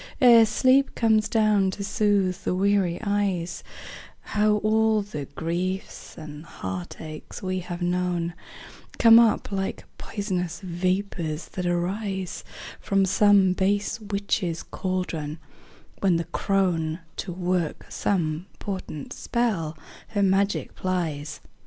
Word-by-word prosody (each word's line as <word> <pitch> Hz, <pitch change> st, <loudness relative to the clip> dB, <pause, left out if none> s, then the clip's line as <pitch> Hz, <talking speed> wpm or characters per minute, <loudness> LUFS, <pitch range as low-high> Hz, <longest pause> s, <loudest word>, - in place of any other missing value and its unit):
Ere 235 Hz, -4 st, +8 dB
sleep 260 Hz, +5 st, +3 dB
comes 220 Hz, -2 st, +3 dB
down 210 Hz, -3 st, +3 dB
to 200 Hz, +2 st, -4 dB
soothe 200 Hz, -3 st, +1 dB
the 180 Hz, -, 0 dB
weary 195 Hz, -2 st, +2 dB
eyes, 195 Hz, -4 st, -1 dB, 0.6 s
How 210 Hz, 0 st, +2 dB
all 220 Hz, 0 st, +3 dB
the 150 Hz, -8 st, -6 dB
griefs 175 Hz, +6 st, -4 dB
and 150 Hz, -1 st, -9 dB
heartaches 150 Hz, -, -7 dB
we 185 Hz, 0 st, -1 dB
have 175 Hz, 0 st, -5 dB
known 175 Hz, -1 st, 0 dB, 0.6 s
Come 230 Hz, 0 st, +8 dB
up 225 Hz, -2 st, +3 dB
like 195 Hz, -1 st, -3 dB
pois'nous 185 Hz, -5 st, -3 dB
vapors 180 Hz, -3 st, -2 dB
that 180 Hz, -1 st, -3 dB
arise 190 Hz, +2 st, -2 dB, 0.4 s
From 195 Hz, -1 st, +2 dB
some 195 Hz, -1 st, +5 dB
base 200 Hz, +4 st, 0 dB
witch's 200 Hz, -5 st, -2 dB
caldron, 175 Hz, -5 st, -3 dB, 0.6 s
when 190 Hz, -3 st, +3 dB
the 165 Hz, -, 0 dB
crone, 175 Hz, -4 st, 0 dB, 0.2 s
To 185 Hz, -, -4 dB
work 180 Hz, -2 st, -1 dB
some 170 Hz, -2 st, -1 dB
potent 185 Hz, -7 st, -5 dB
spell, 195 Hz, -10 st, -1 dB, 0.3 s
her 205 Hz, -2 st, 0 dB
magic 195 Hz, +1 st, +1 dB
plies. 160 Hz, -5 st, -3 dB
185 Hz, 115 wpm, -25 LUFS, 170-205 Hz, 0.6 s, Ere